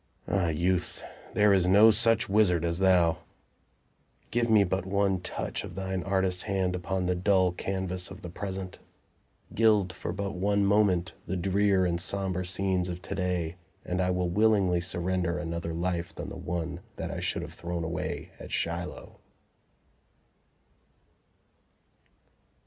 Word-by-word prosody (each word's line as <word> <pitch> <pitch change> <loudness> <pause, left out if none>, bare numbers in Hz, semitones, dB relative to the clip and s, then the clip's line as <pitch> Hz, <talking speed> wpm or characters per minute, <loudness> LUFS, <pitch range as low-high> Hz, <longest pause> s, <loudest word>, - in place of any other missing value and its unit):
Ah, 95 -3 +1
Youth, 85 +3 0 0.3
there 105 -1 +5
is 95 -2 +3
no 105 +4 +7
such 115 +1 +3
wizard 95 -5 +3
as 85 +1 -1
thou! 90 -4 +4 1.1
Give 120 +1 +1
me 110 -2 +6
but 95 0 -1
one 95 0 +1
touch - - -4
of 85 - -8
thine 95 -1 -2
artist 95 -1 0
hand 95 -3 -1
upon 90 +1 -2
the 90 - +1
dull 95 0 +3
canvas 95 0 -3
of - - -11
the 85 - -6
Present; 95 0 -5 0.7
gild 105 -5 +3
for - - -5
but 100 +1 -3
one 100 +2 +1
moment 100 -3 +2
the 95 - -2
drear 95 +1 +2
and 85 -1 0
somber 95 -1 -1
scenes 90 0 0
of 90 0 -4
to - - -4
day, 90 -3 -2 0.3
and 90 +1 -1
I 90 - +1
will 90 -1 0
willingly 100 -3 +3
surrender 90 0 -1
an 85 -1 -4
other 85 0 -3
life 85 +1 -2
than - - -6
the - - -8
one 85 0 -4 0.2
that - - -4
I - - -4
should - - -2
have - - -8
thrown 85 0 -4
away 80 -1 -4
at - - -9
Shiloh. 85 +1 -4
90 Hz, 150 wpm, -28 LUFS, 90-100 Hz, 1.1 s, no